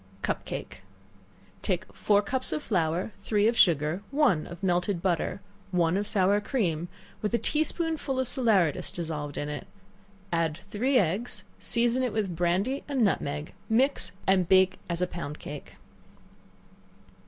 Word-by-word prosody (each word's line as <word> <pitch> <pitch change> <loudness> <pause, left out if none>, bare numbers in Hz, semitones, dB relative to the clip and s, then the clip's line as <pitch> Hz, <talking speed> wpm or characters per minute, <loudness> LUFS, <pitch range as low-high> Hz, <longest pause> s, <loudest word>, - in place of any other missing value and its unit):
Cup - - -1
Cake. - - -6 0.8
Take 185 -3 -2
four 205 -1 +3
cups 255 +5 -1
of 300 - -2
flour, 175 0 0
three 205 +1 +1
of 235 - +2
sugar, 160 -2 +3
one 275 - +2
of 175 +2 -10
melted 180 0 +1
butter, 180 +2 -1 0.3
one 175 -2 +2
of 205 +1 0
sour 200 +1 +3
cream, 175 - -1 0.3
with 215 +2 0
a - - +4
tea 305 +5 +1
spoonful 315 -5 -2
of 260 - +1
salaeratus 215 - +2
dissolved 150 -4 -4
in 145 - -2
it, 150 0 -5 0.6
and 165 -2 0
three 210 +8 0
eggs; 200 +4 +1 0.2
season 240 +2 +2
it 250 -3 0
with 200 -5 -1
brandy 185 - 0
and 275 -5 +1
nutmeg; 150 -7 -1 0.2
mix, 230 -5 +2
and 185 -2 +3
bake 190 0 +6
it - - -19
as 170 +1 0
pound 155 -3 -5
cake. 145 -1 -9
190 Hz, 150 wpm, -28 LUFS, 170-235 Hz, 0.8 s, bake